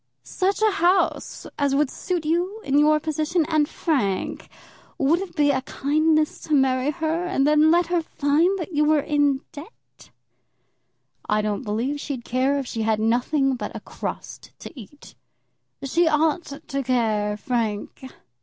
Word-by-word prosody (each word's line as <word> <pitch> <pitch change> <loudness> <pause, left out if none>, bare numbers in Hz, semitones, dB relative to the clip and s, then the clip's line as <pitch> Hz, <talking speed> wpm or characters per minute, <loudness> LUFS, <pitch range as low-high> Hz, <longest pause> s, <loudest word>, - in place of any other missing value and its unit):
"Such 395 +3 -1
a 435 - +4
house 370 -1 0
as 280 -1 +1
would 290 -1 +1
suit 350 -4 -3
you 350 +7 -1
in 280 +1 +2
your 305 +1 +4
position? 310 +2 -1
And, 310 -2 +1
Frank, 225 - -2 0.5
would 295 +5 +2
it 370 -3 -7
be 290 -2 +3
a 260 -1 0
kindness 310 +3 0
to 305 - +1
marry 265 0 +2
her 325 +2 -2
and 315 -7 +1
then 300 +1 +4
let 345 +2 +4
her 345 0 0
find 320 +5 +1
that 355 -1 -6
you 300 -1 +1
were 300 0 +3
in 290 -2 +1
debt?" 310 +10 -14 1.2
"I 210 0 +2
don't 210 -1 -2
believe 245 +5 -2
she'd 265 -5 -5
care 260 +3 +1
if 275 - -3
she 230 -2 -4
had 220 -1 +1
nothing 250 +5 +1
but - - -6
a - - -4
crust - - -8
to - - -10
eat." 270 +3 -13 0.7
"She 330 +5 +2
ought 315 +2 +1 0.2
to 275 0 -2
care, 220 -5 0
Frank." 220 -1 -3
295 Hz, 160 wpm, -23 LUFS, 260-320 Hz, 1.2 s, a